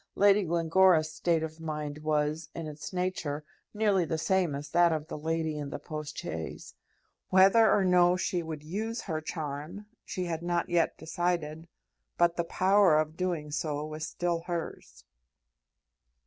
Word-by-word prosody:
Lady 200 +1 +5
Glencora's 165 -1 +3
state 160 +1 +1
of 160 0 -6
mind 150 -2 -4
was, 155 +1 -1
in 165 - -5
its 150 0 -7
nature, 180 -5 -2 0.3
nearly 210 -4 +2
the 160 0 -2
same 180 -2 +1
as 145 +1 -6
that 175 +2 +4
of 155 -2 -2
the - - -4
lady 160 0 -2
in 145 -1 -4
the - - -4
post 150 -1 -7
chaise. 80 0 -6 0.6
Whether 195 +4 +6
or 195 - +3
no 180 0 +4
she 180 -1 -1
would 160 -2 -6
use 220 +8 -3
her 155 -1 -3
charm, 155 +4 -5 0.2
she 185 - -4
had 165 -2 -3
not 175 0 -1
yet 170 -2 +1
decided, 165 -1 -2 0.5
but 175 0 +3
the 170 - 0
power 185 -1 +4
of 155 0 0
doing 170 -4 -2
so 150 -1 -2
was 155 +2 -5
still 175 -1 -1
hers. 170 - -5
165 Hz, 160 wpm, -29 LUFS, 155-180 Hz, 0.6 s, Whether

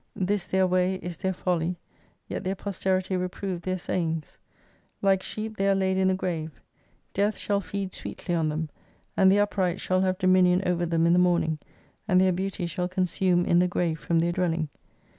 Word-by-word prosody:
This 195 0 -1
their 190 0 +2
way 185 +1 +2
is 175 -3 -6
their 190 +1 -1
folly, 180 -1 -1 0.5
yet - - -4
their 190 +1 -1
posterity 190 -1 -1
reprove 180 0 -3
their 185 +2 -2
sayings. 165 -3 -3 0.6
Like 195 -1 +3
sheep 215 +2 -5
they 195 0 +2
are 195 - +4
laid 190 -1 +1
in 190 0 +2
the 190 - +3
grave, 165 -5 -4 0.5
death 205 +2 +1
shall 200 -1 0
feed 195 0 -4
sweetly 175 - -5
on 160 -2 +1
them, 155 +1 -3 0.5
and 190 0 +5
the 200 - +4
upright 190 -3 +1
shall 185 0 +1
have 185 -1 +1
dominion 185 -1 +4
over 175 -1 +1
them 165 0 +2
in 170 - +4
the 180 - +5
morfiing, 170 -3 +2 0.5
and 185 - +4
their 185 0 +4
beauty 185 0 -2
shall 180 +1 -2
consume 180 -1 +1
in 170 - +4
the 180 - +4
grave 170 -2 -1
from 170 - 0
their 170 +1 +2
dwelling. 170 -3 0
185 Hz, 190 wpm, -27 LUFS, 175-190 Hz, 0.6 s, and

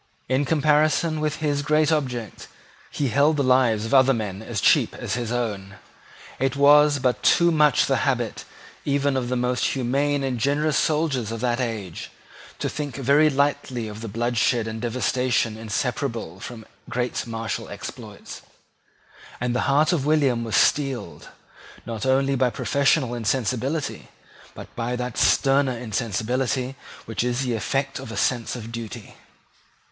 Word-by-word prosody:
In 130 +3 +1
comparison 155 +1 +2
with 155 0 -1
his 145 -2 -1
great 155 +1 +2
object 125 -8 -3 0.4
he 140 -3 -2
held 145 +5 +3
the 140 - +1
lives 125 -4 +3
of 115 - -4
other 135 -1 +5
men 105 -3 -4
as 110 -1 -4
cheap - - +3
as - - -4
his 120 -2 -3
own. 105 -5 -3 0.6
It 135 0 0
was 145 +1 +6
but 125 -2 0
too 170 0 +4
much 150 -4 +4
the - - +1
habit, - - -1 0.4
even 140 -1 +1
of 125 -2 -1
the 125 - 0
most 125 0 0
humane 140 +2 0
and 130 -3 -2
generous 145 +4 +1
soldiers 150 -8 0
of 115 - -4
that 120 -1 0
age, 105 -8 -5 0.5
to - - -2
think 145 -3 -5
very 140 +3 +4
lightly 135 -4 -1
of 105 0 -8
the 115 - -5
bloodshed 120 +1 0
and 110 0 -5
devastation 120 -1 0
inseparable 115 - -3
from 110 0 -9 0.2
great 125 -1 -2
martial 115 -1 -4
exploits; - - -9 1.0
and 125 0 -1
the 125 - 0
heart 150 +5 +3
of 145 -4 -1
William 140 -6 +2
was 110 -4 -2
steeled, 130 - 0 0.6
not 115 +1 -4
only 135 +1 +2
by 130 -1 +2
professional 140 0 +1
insensibility, 130 +5 -2 0.5
but - - -11
by 120 +1 -2
that 125 -1 -4
sterner 135 -2 +3
insensibility 125 +3 -2 0.3
which 115 +1 -2
is 125 +1 -1
the 125 -2 -1
effect 135 +4 -2
of 115 - -8
a - - -6
sense 120 -2 0
of 115 -2 -8
duty. 115 -3 -7
125 Hz, 150 wpm, -23 LUFS, 115-140 Hz, 1.0 s, was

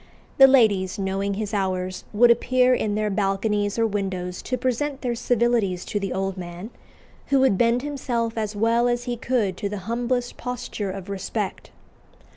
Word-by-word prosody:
The 270 - +10
ladies, 215 -7 +3
knowing 195 0 -1
his 210 0 -4
hours, 185 -2 -2
would 235 +3 +6
appear 255 +2 +3
in 210 -4 0
their 210 0 0
balconies 205 +1 0
or 230 - +3
windows 190 -4 -3
to 255 - -2
present 260 +3 -1
their 245 -2 -1
civilities 230 -6 +1
to 205 - -2
the 195 -2 -3
old 195 0 -2
man, 175 +4 -7 0.6
who 275 -1 +3
would 265 -7 +4
bend 235 +4 +2
himself 245 -6 -2
as 215 -2 -3
well 230 +3 +2
as 240 0 0
he 245 -1 -3
could 230 -6 -1
to 200 - -3
the 205 - -4
humblest 245 +2 -2
posture 245 -5 -4
of 190 0 -6
respect. 200 +1 -4
215 Hz, 170 wpm, -24 LUFS, 195-245 Hz, 0.6 s, The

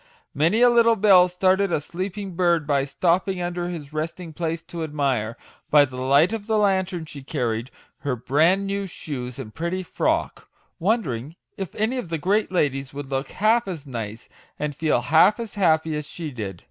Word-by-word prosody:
Many 170 +10 +2
a 245 - +8
little 230 -1 +5
belle 190 -4 +6
startled 185 +2 +2
a 155 - +2
sleeping 185 +4 -5
bird 170 -3 +2
by 140 -2 +1
stop 170 +7 +1
ping 190 -2 -2
under 175 0 -3
his 155 -4 -7
resting 160 +2 -4
place 165 +1 -3
to 170 - -7
admire, 135 -7 -1 0.3
by 145 -1 +6
the 130 -2 -9
light 140 +9 +4
of 220 -2 -5
the 220 -1 +2
lantern 190 -4 +1
she 145 -2 -9
carried, 120 -4 -2 0.3
her 140 -3 -2
bran 155 +11 +2
new 200 0 -2
shoes 125 -8 -6
and 115 -6 -8
pretty 170 +3 -3
frock, - - -1 0.3
wondering 160 - -1 0.2
if 195 -3 -6
any 225 +5 0
of 185 - -6
the 165 - -1
great 200 +7 +1
ladies 140 -6 -1
would 145 -1 -6
look 135 +1 -1
half 220 +3 +2
as 165 -6 -6
nice, 115 -4 -6 0.3
and 150 -1 -2
feel 155 +1 +1
half 165 +8 +4
as 230 -3 -5
happy 160 -5 +2
as 150 -1 -4
she 160 -1 -6
did. 100 -8 -6
165 Hz, 185 wpm, -24 LUFS, 140-190 Hz, 0.3 s, a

